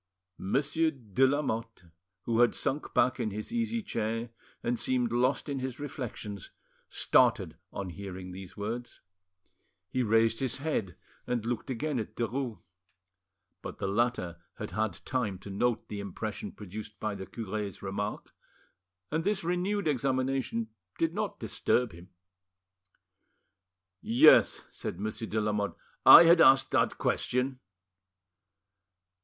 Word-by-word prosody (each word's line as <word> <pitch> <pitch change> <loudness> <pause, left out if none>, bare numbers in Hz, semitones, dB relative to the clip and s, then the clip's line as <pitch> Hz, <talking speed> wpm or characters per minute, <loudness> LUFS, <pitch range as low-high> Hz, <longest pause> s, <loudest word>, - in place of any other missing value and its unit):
Monsieur, 145 +10 +1
de 130 -3 +1
Lamotte, 115 -8 -2 0.4
who 115 -1 0
had 120 0 +5
sunk 145 +3 -2
back 130 +1 +2
in 115 -3 0
his 105 - -6
easy 230 -1 -1
chair 115 - -2 0.3
and 120 0 0
seemed 125 -3 +1
lost 125 +5 +1
in 140 -2 -2
his 130 0 -4
reflections, 120 -8 -6 0.4
started - - +3 0.2
on 95 -2 -5
hearing 95 0 -7
these 95 +1 -10
words. 115 +4 -5 0.9
He 130 - 0
raised 115 0 +3
his 130 -3 -1
head 130 - -2 0.3
and 120 -3 -1
looked 120 0 -3
again 135 +2 -1
at 110 0 -6
Derues. 120 0 -2 1.0
But - - -7
the - - -3
latter 100 -5 -1
had - - -6
had 110 +1 -1
time 120 -7 -1
to 100 +2 -10
note 120 +4 0
the 105 - -5
impression 100 +1 -5
produced 105 +1 -9
by 110 -1 -2
the 95 -1 -7
cure's 105 -3 -5
remark, 100 +2 -4 0.8
and 160 +2 0
this 205 -1 0
renewed 180 +2 0
examination 130 -4 0 0.3
did 165 0 +1
not 210 0 -3
disturb 125 -2 0
him. 85 +2 -13 1.9
"Yes," 115 +2 +6
said 85 - -5
Monsieur 110 +2 -3
de 110 - -1
Lamotte, 105 -1 -1 0.3
"I - - +12
had 170 0 +6
asked 135 0 +6
that - - +2
question." 125 +1 0
115 Hz, 130 wpm, -30 LUFS, 105-135 Hz, 1.9 s, I